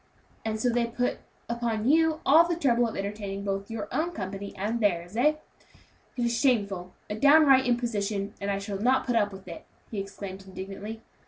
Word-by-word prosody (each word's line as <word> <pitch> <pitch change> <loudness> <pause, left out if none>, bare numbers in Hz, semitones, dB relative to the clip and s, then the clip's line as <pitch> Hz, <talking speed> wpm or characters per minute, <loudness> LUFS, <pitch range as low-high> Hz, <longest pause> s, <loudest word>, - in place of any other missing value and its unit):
"And 220 -1 -2
so 245 +2 +2
they 235 0 +1
put 245 +1 -1 0.3
upon 235 -2 -1
you 320 +2 +3
all 320 +5 +7
the 345 - 0
trouble 245 -7 +2
of 225 - -6
entertaining 200 0 -4
both 195 +1 -3
your 220 -2 -4
own 320 +7 -1
company 200 - -5
and 215 +5 -1
theirs, 175 -3 0
eh? 290 +6 +4 0.8
It 240 - +1
is 235 0 +1
shameful! 200 -8 0
a - - -4
downright 275 +2 +6
imposition, 210 -4 -1
and 200 - -2
I 200 - 0
shall 200 0 -4
not 255 +5 +2
put 245 - 0
up 205 -2 +2
with 190 -1 -11
it!" 170 - -8 0.3
he 215 - -3
exclaimed 195 -1 -7
indignantly. 195 +4 -7
220 Hz, 185 wpm, -27 LUFS, 200-245 Hz, 0.8 s, all